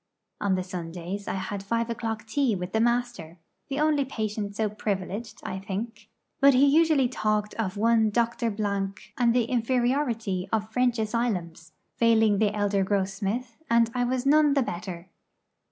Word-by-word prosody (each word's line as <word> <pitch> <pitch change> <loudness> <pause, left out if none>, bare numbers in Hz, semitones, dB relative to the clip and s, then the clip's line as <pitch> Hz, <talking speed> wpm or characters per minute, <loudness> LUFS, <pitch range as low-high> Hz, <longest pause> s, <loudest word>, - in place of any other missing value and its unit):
On 195 -2 +1
the 185 - -1
Sundays 180 +2 -6
I - - -2
had 195 +1 -4
five 230 +3 -1
o'clock 225 -1 -4
tea 245 0 +1
with 180 0 -5
the 220 - +2
Master 235 -8 -1 0.3
the 275 +1 -2
only 300 -2 +3
patient 215 -5 -4
so 220 0 +1
privileged, 210 +1 -4
I 190 - -4
think; 210 +3 -6 0.3
but 275 -1 +6
he 265 +3 +6
usually 300 -2 +4
talked 215 -3 -1
of 205 -3 -3
one 225 0 +3
Dr. 235 +1 0
Blanc 200 0 -3
and 240 -2 +3
the 245 - +4
inferiority 240 -5 0
of 220 0 -1
French 250 +1 +2
asylums, 195 -8 -2 0.2
failing 225 -3 +4
the 215 -2 +3
elder 205 -1 +1
Grossmith, 200 +5 -2
and 230 0 +3
I 250 -1 0
was 250 +1 -1
none 295 0 +5
the 275 - +3
better. 175 -2 -6
220 Hz, 160 wpm, -26 LUFS, 195-240 Hz, 0.3 s, but